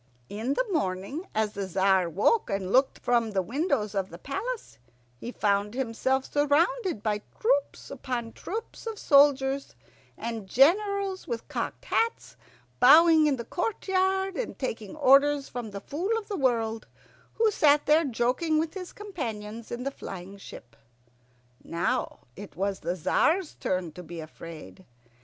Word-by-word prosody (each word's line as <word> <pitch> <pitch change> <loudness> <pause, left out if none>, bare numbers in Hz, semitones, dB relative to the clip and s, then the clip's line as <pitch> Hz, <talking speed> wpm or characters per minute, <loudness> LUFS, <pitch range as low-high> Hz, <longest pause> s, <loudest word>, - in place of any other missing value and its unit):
In 225 +7 -2
the - - +1
morning, 275 - -2
as 215 -1 0
the 200 -1 -4
Tzar 190 -1 +2
woke 210 - +2
and 195 -2 -2
looked 265 +3 +3
from 235 -2 +1
the 195 -3 0
windows 230 - -1
of 195 -2 -1
the 170 - -10
palace, 390 - -5 0.4
he 240 - -6
found 205 0 0
himself 260 +1 0
surrounded 300 - +1
by 210 -2 0 0.2
troops - - 0
upon 240 -3 -4
troops 450 +3 -7
of 445 -2 -4
soldiers, 280 -2 +3 0.4
and 225 -4 -5
generals 385 - +2
in 235 -2 -2
cocked - - -4
hats 460 -2 -1 0.4
bowing 315 +4 +7
in 285 - +2
the 235 -2 -6
courtyard 380 -1 0
and - - -4
taking 225 -5 -4
orders 280 0 +4
from 240 -3 -6
the 200 -1 -7
Fool 365 - -2
of 445 - -6
the 415 - -3
World, 230 - 0 0.5
who 445 -1 +3
sat 295 -5 +4
there 310 +2 +5
joking 260 +5 0
with 315 +1 -1
his 370 -2 -7
companions 230 - -6
in 240 +1 -4
the 275 - -2
flying 195 -5 -9
ship. 120 -10 -12 0.9
Now 170 +1 -2
it 200 -7 -10
was 195 +2 -2
the 175 - -2
Tzar's 315 - +1
turn 180 -3 -2
to 180 - -10
be 170 0 -8
afraid. 165 +3 -10
260 Hz, 150 wpm, -27 LUFS, 205-340 Hz, 0.9 s, bowing